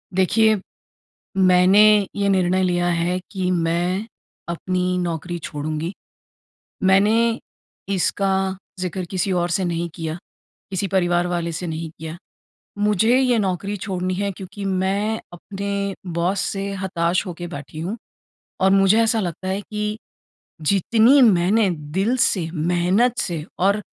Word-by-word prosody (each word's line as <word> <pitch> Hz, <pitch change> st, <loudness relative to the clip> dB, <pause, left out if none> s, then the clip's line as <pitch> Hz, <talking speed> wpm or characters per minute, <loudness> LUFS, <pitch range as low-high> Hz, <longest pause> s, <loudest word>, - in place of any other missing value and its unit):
देखिए, 220 Hz, +4 st, +4 dB, 0.8 s
मैंने 185 Hz, +1 st, +5 dB, 0.3 s
ये 200 Hz, -1 st, +1 dB
निर्णय 185 Hz, -1 st, +2 dB
लिया 175 Hz, -1 st, +1 dB
है 175 Hz, +2 st, 0 dB
कि 185 Hz, -3 st, -1 dB
मैं 175 Hz, +3 st, 0 dB, 0.4 s
अपनी 180 Hz, +1 st, -1 dB
नौकरी 175 Hz, 0 st, -3 dB
छोडूँगी। 155 Hz, +3 st, -4 dB, 0.9 s
मैंने 220 Hz, +5 st, +3 dB, 0.5 s
इसका 190 Hz, 0 st, 0 dB, 0.2 s
ज़िक्र 185 Hz, 0 st, -3 dB
किसी 190 Hz, 0 st, -1 dB
और 175 Hz, -1 st, 0 dB
से 180 Hz, +2 st, 0 dB
नहीं 170 Hz, 0 st, -2 dB
किया। 160 Hz, -1 st, -4 dB, 0.5 s
किसी 195 Hz, +1 st, -2 dB
परिवार 175 Hz, -2 st, +1 dB
वाले 170 Hz, -1 st, -2 dB
से 165 Hz, +2 st, -4 dB
नहीं 160 Hz, 0 st, -4 dB
किया। 160 Hz, +1 st, -6 dB, 0.6 s
मुझे 210 Hz, +4 st, +3 dB
ये 250 Hz, -3 st, +3 dB
नौकरी 200 Hz, 0 st, -1 dB
छोड़नी 185 Hz, -2 st, -2 dB
है 200 Hz, +2 st, -1 dB
क्योंकि 195 Hz, +2 st, -8 dB
मैं 195 Hz, +3 st, 0 dB
अपने 200 Hz, +2 st, -4 dB, 0.2 s
बॉस 180 Hz, +3 st, +1 dB
से 195 Hz, +1 st, -2 dB
हताश 170 Hz, -1 st, 0 dB
हो 180 Hz, -, -4 dB
के 175 Hz, +1 st, -6 dB
बैठी 145 Hz, +2 st, -8 dB
हूँ। 185 Hz, +7 st, -3 dB, 0.6 s
और 190 Hz, -, +4 dB
मुझे 195 Hz, +2 st, +5 dB
ऐसा 225 Hz, 0 st, +2 dB
लगता 185 Hz, 0 st, -4 dB
है 190 Hz, +1 st, -1 dB
कि 210 Hz, +1 st, -4 dB, 0.7 s
जितनी 225 Hz, +7 st, +4 dB
मैंने 205 Hz, 0 st, +4 dB
दिल 175 Hz, +9 st, -1 dB
से, 185 Hz, -9 st, +1 dB
मेहनत 180 Hz, +9 st, +1 dB
से 165 Hz, -4 st, -2 dB
और 200 Hz, +3 st, +2 dB
185 Hz, 135 wpm, -22 LUFS, 175-200 Hz, 0.9 s, मैंने